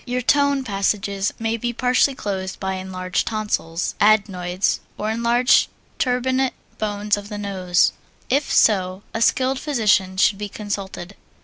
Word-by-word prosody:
Your 250 +1 -1
tone 280 +1 +3
passages 200 -2 -1
may 225 0 -1
be 240 +1 -3
partly 255 +3 +2
closed 190 -4 -4
by 190 0 -2
enlarged 185 -1 -3
tonsils, 210 -6 -2
adenoids, 195 -3 +2 0.2
or 215 +1 -2
enlarged 235 +2 +3 0.3
turbinate 260 +1 +1 0.2
bones 210 -1 0
of 205 0 -8
the 210 - -5
nose. 190 -3 +1 0.3
If 280 +2 0
so, 190 -2 +3
a 225 - -3
skilled 260 +3 +2
physician 210 -9 +1
should 195 +1 +3
be 205 0 -4
consulted. 200 -2 -6
210 Hz, 135 wpm, -21 LUFS, 190-240 Hz, 0.3 s, tone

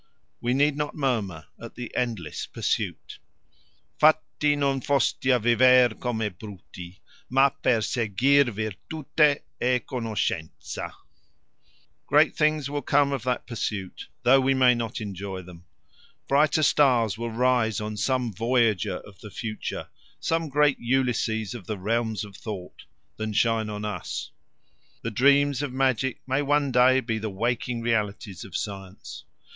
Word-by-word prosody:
We 120 +1 0
need 145 +1 +3
not 150 0 -3
murmur 110 - -2 0.2
at - - -9
the 120 -1 -7
endless 110 -11 -3
pursuit: - - -3 0.8
Fatti 155 -1 +3
non 140 -2 0
foste 140 +2 +1
a 130 -1 +5
viver 125 +1 +5
come 120 -3 -2 0.2
bruti 95 -3 -10 0.3
Ma 135 +2 +5
per 125 -3 0
seguir 125 +6 +2
virtute 135 - 0 0.2
e 125 +1 +3
conoscenza. 110 -9 -3 1.2
Great - - +4
things 155 -2 +1
will 145 +1 -3
come 140 +1 +2
of 135 -3 -2
that 125 -1 -1
pursuit, 105 -5 -5 0.2
though 135 +2 +6
we 135 +1 +2
may 130 -1 +5
not 115 -1 -4
enjoy 95 -2 -6
them. 90 -1 -14 0.6
Brighter 150 +2 +3
stars 125 -8 +3
will 115 +1 -4
rise 120 -2 +1
on 105 0 -4
some 125 +1 0
voyager 115 -2 +1
of 100 -3 -16
the 105 - -10
future 110 +1 -5 0.3
some 165 -1 -1
great 145 -1 +3
Ulysses 120 -4 0
of 115 -7 -9
the 110 - -3
realms 110 +2 -1
of 100 -2 -13
thought 100 -5 -8 0.3
than 110 0 -3
shine 115 0 +1
on 105 0 -5
us. 105 - -5 0.7
The 115 - -3
dreams 140 +3 +3
of 145 -3 -3
magic 130 -1 0
may 135 +2 +1
one 145 -1 +1
day 130 +1 +5
be 115 -3 -2
the 110 0 -3
waking 115 +4 -2
realities 105 -4 -2
of 95 - -5
science. 95 -2 -7
120 Hz, 140 wpm, -26 LUFS, 105-135 Hz, 1.2 s, though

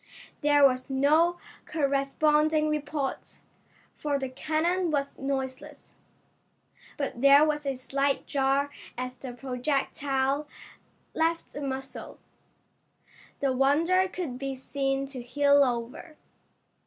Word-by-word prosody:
There 290 -1 +5
was 255 -1 +1
no 305 +6 +3 0.3
corresponding 300 +1 +2
report, 295 -2 -3 0.6
for 290 -2 -1
the 265 -1 -4
cannon 330 +6 0
was 280 -2 -1
noiseless, 270 +2 -5 1.0
but 270 -4 -4
there 280 +2 +7
was 295 -2 -1
a 270 - 0
slight 275 +2 -1
jar 275 0 +1 0.3
as 255 0 -4
the 255 0 -8
projectile 270 +2 -1 0.7
left 330 +1 -1
the 290 - -6
muzzle. 270 -1 -6 1.2
The 275 -2 +2
Wonder 325 +8 +3
could 330 -10 -5
be 275 -1 -3
seen 270 +1 -2
to 270 -2 -8
heel 285 +3 +4
over. 250 +6 -4
280 Hz, 105 wpm, -28 LUFS, 265-300 Hz, 1.2 s, there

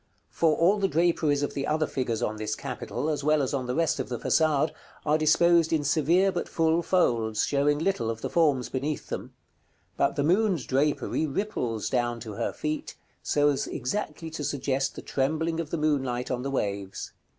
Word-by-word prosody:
For 160 -2 +2
all 190 +5 +4
the 195 - +2
draperies 160 -3 +2
of - - -2
the 140 - -2
other 155 0 +1
figures 125 -6 -2
on 110 - -2
this 110 0 -2
capital, 130 +5 -4
as 150 -2 -1
well 155 +1 +3
as 130 - -2
on 130 -3 -2
the 125 - -2
rest 165 -3 +1
of 130 - -3
the 120 - -2
façade, 155 +2 +2 0.3
are 150 0 +3
disposed 165 +2 +4
in 155 -2 +1
severe 165 +7 +3
but 175 - -3
full 165 +1 +2
folds, 115 - +1
showing 145 +1 +2
little 155 -8 0
of 115 -1 -4
the - - -3
forms 145 -7 +2
beneath 140 +3 -3
them; - - -6 0.6
but 140 0 +2
the 145 - 0
moon's 180 - +2
drapery 145 +3 0
ripples 135 - -2
down 120 -2 0
to 110 -1 -7
her - - -2
feet, 155 0 -4 0.3
so 145 0 +2
as 140 - -1
exactly 160 +1 -4
to 155 -1 -5
suggest 135 -1 -1
the - - -8
trembling 160 +4 -1
of 165 -3 -3
the 170 - -2
moonlight 135 -5 0
on 125 -1 -1
the 135 - -3
waves. 100 -7 -3
145 Hz, 195 wpm, -27 LUFS, 130-160 Hz, 0.6 s, all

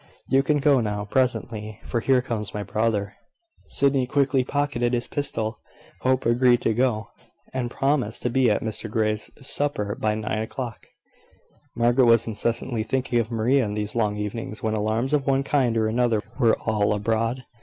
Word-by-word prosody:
You 135 - +4
can 150 +2 +1
go 140 -2 +4
now, 105 -2 -2
presently, 110 -3 -1
for 120 - -1
here 125 +1 +2
comes 105 -5 -4
my 105 - -2
brother." 105 -1 -1 0.5
Sydney 135 -2 +2
quickly 135 -1 +2
pocketed 130 -3 -1
his 120 0 -1
pistol. 115 -6 -2 0.4
Hope 130 0 +1
agreed 120 +1 +4
to 115 - +1
go, 115 -2 0 0.4
and 125 -2 -2
promised 135 -4 0
to 125 - 0
be 130 -1 +3
at 105 - +1
Mr 110 0 -4
Grey's 110 0 -1
to - - -16
supper 130 -7 -1
by 105 0 -1
nine 110 0 -2
o'clock. 120 +1 -6 0.9
Margaret 120 +2 +4
was 115 -1 +5
incessantly 115 +2 -2
thinking 125 +1 0
of 115 -1 -1
Maria 120 +4 +2
in 105 -2 -3
these 105 -1 -3
long 105 -3 0
evenings, 105 +1 -5
when 110 -1 0
alarms 110 +5 0
of 145 -3 +1
one 135 0 +2
kind 130 -5 +1
or 110 -1 +2
another 115 -1 +1 0.2
were 115 -4 +4
all 105 -2 +1
abroad. 115 +4 -1
115 Hz, 175 wpm, -24 LUFS, 110-130 Hz, 0.9 s, was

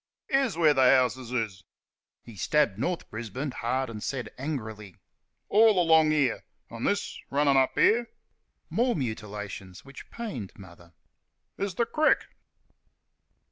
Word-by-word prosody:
"Here's 270 - +1
where 160 -3 +5
th' - - -10
houses 130 -1 +3
is" 110 -7 -3 0.6
(he 115 - -12
stabbed 105 - +1
North 175 +7 -2
Brisbane 120 +6 -5
hard 130 +2 -2
and 110 -2 -7 0.4
angrily), 110 - -5 0.5
"all 215 -2 +5
along 160 -2 +5
here.... 145 -6 +1 0.3
And - - -3
this, - - -1
runnin' 140 0 +2
up 130 -1 +3
here" 235 +2 +3 0.6
(more 245 +1 +1
mutilations 105 - -6
which 135 0 -12
pained 200 - -6
Mother), 85 -2 -15 0.7
"is 195 -3 -2
th' 235 - +1
crick." 310 0 +3
130 Hz, 125 wpm, -27 LUFS, 110-165 Hz, 0.7 s, where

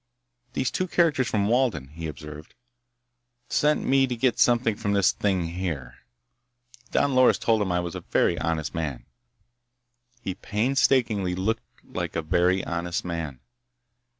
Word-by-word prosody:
"Those 130 - 0
two 185 - -1
characters 160 -8 +2
from 100 -3 +1
Walden," 115 - +1
he 80 +2 -6
observed, 75 +1 -9 0.9
"sent 150 0 +2
me 135 0 +4
to 125 - -2
get 120 +1 +1
something 120 -2 +3
from 100 -1 -2
this 100 -2 +4
thing, 95 -5 -1
here. 80 -8 -5 0.9
Don 145 -1 +1
Loris 130 0 +5
told 110 -2 +2
'em 95 -3 0
I 90 0 +1
was 85 -1 -5
a - - -6
very - - +1
honest 80 -2 -2
man." 75 -7 -4 1.2
He 95 - -2
painstakingly 110 -4 +1
looked 110 +5 -3
like - - -5
a 85 - -1
very 90 +3 +2
honest 85 +1 -3
man. 80 -7 -4
95 Hz, 145 wpm, -25 LUFS, 85-120 Hz, 1.2 s, Loris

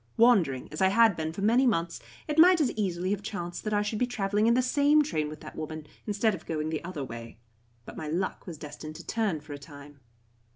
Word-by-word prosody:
Wandering 195 - +4
as 155 - -5
I 190 - +6
had 220 0 +5
been 160 -1 -3
for 195 +4 -5
many 240 +5 +4
months, 170 -6 0 0.3
it 300 +1 0
might 355 +1 +8
as 290 -5 +2
easily 185 -3 -2
have 205 -1 -1
chanced 175 -5 -5
that 215 - -1
I 205 - +2
should 210 +1 -3
be 250 - +2
travelling 210 -2 0
in 235 - +4
the 255 - +4
same 290 +4 +4
train 155 - -2
with 155 - -9
that - - -10
woman, 155 0 -6 0.2
instead 210 +1 +1
of 180 - -8
going 155 -1 -2
the 155 - -3
other 170 -5 -5
way. 115 -2 -8 0.5
But - - -10
my 155 - -5
luck 180 +6 -3
was 170 -3 -7
destined 155 +1 -8
to - - -10
turn 210 -9 -1
for 150 0 -9
a 145 - -7
time. 145 -1 -13
185 Hz, 240 wpm, -28 LUFS, 155-225 Hz, 0.5 s, might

